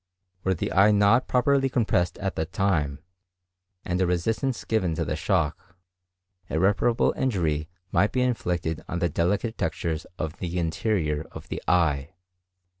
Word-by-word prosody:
Were 95 0 +1
the - - -3
eye 100 +2 +6
not 105 +4 +4
properly 135 +1 +3
compressed 105 -8 +1
at 95 -1 -3
that 80 +2 -3
time, 85 -7 0 0.8
and 90 +1 -1
a 95 - +3
resistance 110 +8 -1
given 95 -7 0
to - - -1
the - - -2
shock, 85 0 -1 0.7
irreparable 100 +7 +2
injury 80 - 0 0.2
might 100 - +3
be 130 - 0
inflicted 90 -10 -1
on 85 - -2
the 85 0 +1
delicate 100 +9 0
textures 80 -1 -2
of 80 0 -4
the 90 -1 -3
interior 80 -3 -1
of - - -10
the - - -4
eye." 80 -5 +1
90 Hz, 145 wpm, -26 LUFS, 80-105 Hz, 0.8 s, eye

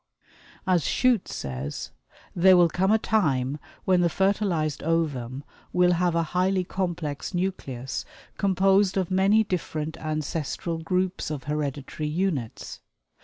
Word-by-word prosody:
As 180 -4 +3
Shute 250 -6 +2
says: 65 +2 -5 0.4
"There 185 +1 +6
will 175 -1 +5
come 190 +4 +1
a 220 - +6
time 150 -11 +1 0.3
when 185 -1 +4
the 175 - +3
fertilized 190 -5 0
ovum 145 -5 -1 0.3
will 180 0 +4
have 175 -1 +1
a 165 - +2
highly 185 +1 +2
complex 175 -4 -3
nucleus 135 -9 -3 0.3
composed 195 0 +3
of 185 -1 0
many 195 +4 +4
different 160 -5 -3
ancestral 155 +1 -3
groups 185 +2 -1
of 150 -4 -4
hereditary 150 +1 -3
units. 155 - -2
175 Hz, 120 wpm, -26 LUFS, 150-190 Hz, 0.4 s, There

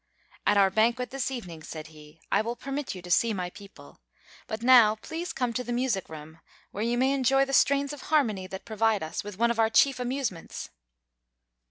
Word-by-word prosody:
"At 205 - +4
our 195 -1 +5
banquet, 235 +4 +1
this 270 -1 -2
evening," 180 -11 -7
said 155 0 -8
he, 150 +1 -16
"I - - +3
will 230 +2 -3
permit 275 0 -5
you 180 - -9
to 180 - -7
see 225 +4 +3
my 180 -1 -4
people. 200 0 -15 0.5
But 220 0 -5
now 240 -4 +7
please 330 +10 -6
come 250 -3 -2
to 250 - -2
the 245 - -5
music 240 -6 -1
room, 160 +1 -10 0.3
where 205 - -4
you 235 +1 0
may 260 +2 +3
enjoy 270 0 +3
the 275 - -6
strains 280 +1 +3
of 290 - -9
harmony 220 -12 +1
that 190 0 -8
provide 220 -3 +1
us 160 - -4
with 205 -2 -8
one 235 +2 +3
of 235 - -3
our 220 -1 +4
chief 270 +3 +3
amusements." 250 -8 -4
230 Hz, 205 wpm, -27 LUFS, 190-260 Hz, 0.5 s, now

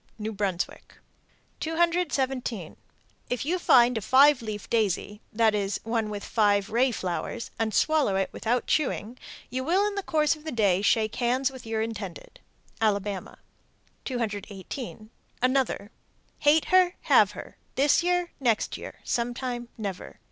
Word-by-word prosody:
New 220 0 -4
Brunswick. 195 -4 -3 0.6
217. 275 - -1 0.5
If 245 +2 -2
you 360 +4 0
find 245 -6 +5
a 220 - -1
five 275 +4 +5
leaf 215 -2 -6
daisy 210 -2 0
(that 220 0 +3
is, 200 -1 -1
one 225 -1 -1
with 205 -1 -5
five 205 -1 +2
ray 250 +4 +3
flowers) 200 +2 -4
and 225 -1 0
swallow 295 -2 +2
it 195 0 0
without 240 +2 -1
chewing, 255 -5 -1 0.3
you 260 +1 -2
will 365 +8 +2
in 415 - -1
the 400 - -2
course 310 -4 +1
of 305 - -16
the 315 - -4
day 200 -6 +2
shake 215 +1 +2
hands 255 +2 +1
with 260 -3 -11
your 220 0 -1
intended. 210 -5 -7 0.4
Alabama. 205 -2 -1 0.7
218. 215 -1 -5 0.3
Another: 255 -5 0 0.5
Hate 300 +2 +4
her, 370 -1 +4
Have - - +4
her, - - -10 0.2
This 285 +4 +4
year, 355 0 0
Next 235 -5 +1
year, - - -10
Sometime, 240 0 -2
Never. 200 -4 -6
235 Hz, 140 wpm, -27 LUFS, 210-275 Hz, 0.7 s, find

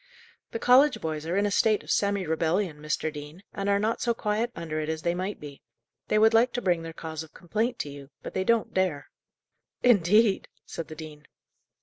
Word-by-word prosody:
"The - - -4
college 260 +5 +5
boys 155 -1 -4
are 175 +3 0
in 200 - +2
a 205 - 0
state 215 +1 +3
of - - -5
semi 200 -2 +1
rebellion, 160 +1 0
Mr. 155 +1 -2
Dean, 150 +5 -9
and 200 0 -2
are 200 - +4
not 215 +3 -1
so 235 -1 +1
quiet 215 +2 -1
under 155 -2 -4
it 155 0 -3
as 160 0 -3
they 170 - +1
might 185 +3 -4
be. 145 -2 -10 0.5
They - - +2
would 220 +1 +5
like 235 +3 +4
to 245 - -2
bring 175 -5 +1
their 165 0 -6
cause 160 -1 -6
of 160 -1 -12
complaint 220 +8 -2
to 145 - -6
you; 140 -1 -11
but - - -7
they 190 - 0
don't 230 +2 +1
dare." 185 -6 -1 0.7
"Indeed!" 210 -2 +4 0.2
said 165 - -6
the 155 - -9
dean. 150 -1 -10
185 Hz, 215 wpm, -27 LUFS, 155-215 Hz, 0.7 s, college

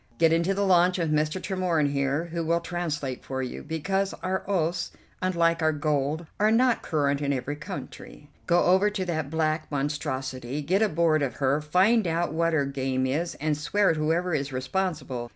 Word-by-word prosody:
Get 165 -1 +4
into 170 +4 +1
the 200 +1 +1
launch 180 -1 +4
with 165 -3 0
Mr. 155 +4 0
Tremorne 180 -6 0
here, 140 +3 0
who 170 0 -3
will 170 +1 +1
translate 160 -7 -4
for 130 0 -3
you, 125 - -5
because 190 +5 -2
our 190 +1 -1
oaths, 175 -2 0 0.3
unlike 170 -2 +1
our 160 0 +3
gold, 150 +1 -1
are 210 +1 +4
not 240 +2 +3
current 145 -3 0
in 140 -1 0
every 140 +2 -2
country. 145 0 -9 0.2
Go 175 0 +4
over 190 +3 +4
to 200 -3 -3
that 160 -5 -2
black 155 0 -1
monstrosity; 135 -2 -3
get 185 +8 +1
aboard 165 -6 +2
of 135 -4 -1
her; 140 +2 +1
find 185 +7 +3
out 170 0 0
what 165 +1 +2
their 155 -4 +1
game 130 -1 -1
is, 155 +6 -1
and 155 0 -1
swear 195 +7 +2
at - - -1
whoever 165 +3 0
is 140 -2 -1
responsible. 130 -3 -3
160 Hz, 185 wpm, -26 LUFS, 145-180 Hz, 0.3 s, Get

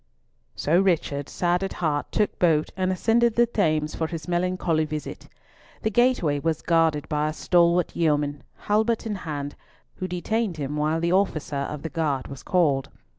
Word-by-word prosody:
So 165 +4 +2
Richard, 155 -7 0
sad 175 +1 0
at 195 - -3
heart, 150 -4 -1
took 210 - 0
boat 160 -3 +2
and 185 0 0
ascended 225 +4 +2
the 240 - +5
Thames 155 -9 0
for 160 - -2
his 160 -2 -6
melancholy 175 -2 0
visit. 155 -1 -6 0.6
The 220 - +1
gateway 210 - +2
was 160 +1 -1
guarded 160 -3 +2
by 150 0 0
a - - -4
stalwart 170 +1 +2
yeoman, 145 -3 +1 0.2
halbert 220 +2 +1
in 220 - -2
hand, 145 -6 -5 0.4
who 185 - -3
detained 185 +2 -2
him 145 0 -3
while 155 +2 0
the 170 +1 +1
officer 155 -7 0
of 150 -1 -6
the 160 - -3
guard 150 -6 -1
was 135 -1 -8
called. 140 -7 +1
165 Hz, 170 wpm, -25 LUFS, 150-185 Hz, 0.6 s, the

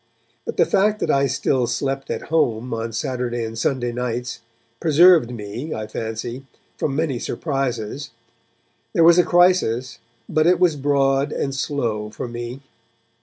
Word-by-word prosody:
But - - -4
the - - +5
fact 210 +2 +2
that - - +1
I 140 0 +3
still 125 -1 0
slept 135 +1 -2
at - - -4
home 120 -6 +1
on 115 0 -3
Saturday 120 0 -2
and 110 0 -6
Sunday 120 +1 -1
nights 125 0 -3 0.4
preserved 165 -3 +6
me, 120 +6 -6
I 110 - -4
fancy, 115 +4 -5 0.3
from 135 - -2
many 145 -5 -1
surprises. 135 -3 -3 0.8
There 170 - +4
was 170 +1 +7
a - - +6
crisis, 175 -11 +2 0.3
but 155 +1 +2
it 180 0 +4
was 175 -4 +3
broad 140 0 +1
and 135 - -2
slow 120 -7 -2
for 110 - -6
me. 120 +2 -6
135 Hz, 150 wpm, -22 LUFS, 120-150 Hz, 0.8 s, was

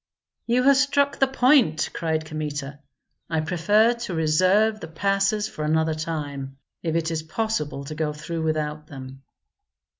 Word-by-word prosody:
"You 245 +2 +2
have 275 0 +6
struck 280 +1 +2
the 270 - +4
point!" 255 - +3
cried 160 -1 -1
Kmita. 150 -2 -5 0.5
"I 160 -1 0
prefer 205 +8 +3
to 235 -7 -5
reserve 185 +8 +3
the 160 - -7
passes 195 +5 0
for 155 - -6
another 160 +1 +1
time, 145 -4 -5 0.2
if 165 -1 -2
it 165 0 0
is 160 -1 -2
possible 160 -5 -3
to 155 - -6
go 155 -1 -1
through 150 +2 -5
without 155 -1 -2
them." 135 -2 -10
160 Hz, 150 wpm, -24 LUFS, 155-210 Hz, 0.5 s, have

